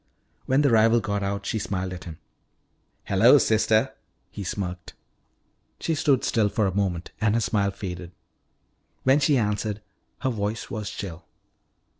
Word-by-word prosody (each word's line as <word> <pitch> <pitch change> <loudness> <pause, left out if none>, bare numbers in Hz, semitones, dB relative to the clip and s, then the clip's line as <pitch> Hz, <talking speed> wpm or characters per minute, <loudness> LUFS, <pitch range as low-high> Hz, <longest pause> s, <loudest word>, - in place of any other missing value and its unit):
When 135 +3 +3
the 140 - +3
rival 115 +1 +5
got 100 -2 -2
out 100 0 -3
she 110 - -1
smiled 95 -2 -3
at 90 - -9
him. 80 -3 -8 0.9
"Hello, - - +6
sister," 110 0 +2 0.4
he 100 - -6
smirked. 90 -1 -5 0.8
She 165 - -1
stood 145 -4 +2
still 110 -3 +2
for 105 +1 0
a 95 - -1
moment 95 -4 -2
and 105 0 +2
her - - +3
smile 105 -3 +1
faded. 90 -3 -6 0.9
When 135 +2 +4
she 140 -1 +3
answered, 105 -1 -1 0.4
her 130 - 0
voice 105 0 -3
was 105 -3 -4
chill. 90 -6 -7
105 Hz, 150 wpm, -25 LUFS, 95-115 Hz, 0.9 s, Hello